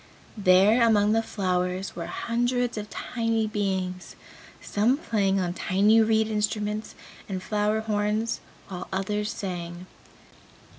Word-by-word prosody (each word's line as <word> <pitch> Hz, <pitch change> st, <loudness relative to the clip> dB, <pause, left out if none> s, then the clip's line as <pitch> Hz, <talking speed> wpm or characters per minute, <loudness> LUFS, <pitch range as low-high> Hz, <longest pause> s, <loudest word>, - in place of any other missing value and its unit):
There 200 Hz, +3 st, +5 dB
among 210 Hz, -3 st, +4 dB
the 225 Hz, +1 st, +3 dB
flowers 185 Hz, -3 st, -2 dB
were 170 Hz, -1 st, -5 dB
hundreds 245 Hz, +5 st, -1 dB
of 210 Hz, -1 st, -5 dB
tiny 230 Hz, -1 st, -1 dB
beings, 190 Hz, -3 st, -3 dB, 0.4 s
some 225 Hz, +6 st, +1 dB
playing 200 Hz, -, +1 dB
on 175 Hz, -2 st, -1 dB
tiny 205 Hz, +5 st, +3 dB
reed 220 Hz, 0 st, +3 dB
instruments 210 Hz, 0 st, -2 dB, 0.3 s
and 190 Hz, -, -2 dB
flower 210 Hz, +1 st, 0 dB
horns, 215 Hz, +1 st, -1 dB, 0.3 s
while 180 Hz, -2 st, -6 dB
others 210 Hz, +2 st, -1 dB
sang. 175 Hz, -2 st, -5 dB
210 Hz, 115 wpm, -26 LUFS, 190-220 Hz, 0.4 s, There